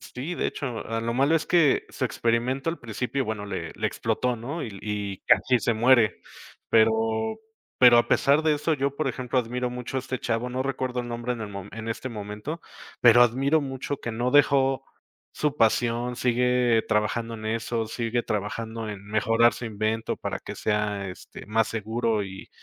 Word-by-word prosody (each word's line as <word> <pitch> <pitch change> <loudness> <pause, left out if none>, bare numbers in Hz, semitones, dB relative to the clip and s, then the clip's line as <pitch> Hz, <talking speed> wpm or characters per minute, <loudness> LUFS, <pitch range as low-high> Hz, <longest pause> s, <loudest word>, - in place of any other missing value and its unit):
Sí, 145 +8 -6
de - - -1
hecho, 125 -6 -4
a 115 0 -2
lo 115 +1 -2
malo 140 +5 +3
es 160 - +1
que 165 -6 +3
su - - -3
experimento 120 +6 0
al 170 - -6
principio, 125 +3 -3
bueno, 105 -2 -4
le - - -5
le - - -1
explotó, 125 -1 -1
¿no? 140 +9 -5
Y, - - -4
l 100 -2 -10
y 105 -2 -3
casi 125 -1 +4
se 115 +2 +1
muere. 120 -1 +4 0.5
Pero 110 0 +2 0.4
pero 120 -2 +8
a 120 - +2
pesar 145 +3 +4
de 155 -1 +3
eso, 150 +2 0
yo, 140 0 -1
por 155 - -1
ejemplo, 125 0 -1
admiro 125 +1 -1
mucho 125 +1 -5
a - - -2
este 130 -1 -4
chavo, 115 +1 -1
no 130 +1 -2
recuerdo 130 -2 -2
el 120 - -7
nombre 120 +1 -3
en 120 - -6
el 105 - -5
mo 100 -1 -7
en 115 0 -6
este 115 +3 -4
momento, 105 +8 -6 0.4
pero 120 0 +8
admiro 135 +6 +3
mucho 135 0 -4
que 120 - -4
no 120 +3 -1
dejó 135 -2 +4 0.5
su 150 -1 -1
pasión, 120 +2 +1
sigue 125 -1 +2
trabajando 115 +2 0
en 110 - -8
eso, 115 +1 -2
sigue 115 +1 -2
trabajando 110 +2 -3
en 100 -2 -7
mejorar 115 +3 +3
su 120 - -6
invento 110 +1 -2
para - - -4
que - - -8
sea, 105 -2 -1
este, 90 - -11
más 110 +1 +1
seguro 110 0 -1
y 95 0 -9
120 Hz, 190 wpm, -26 LUFS, 110-130 Hz, 0.5 s, pero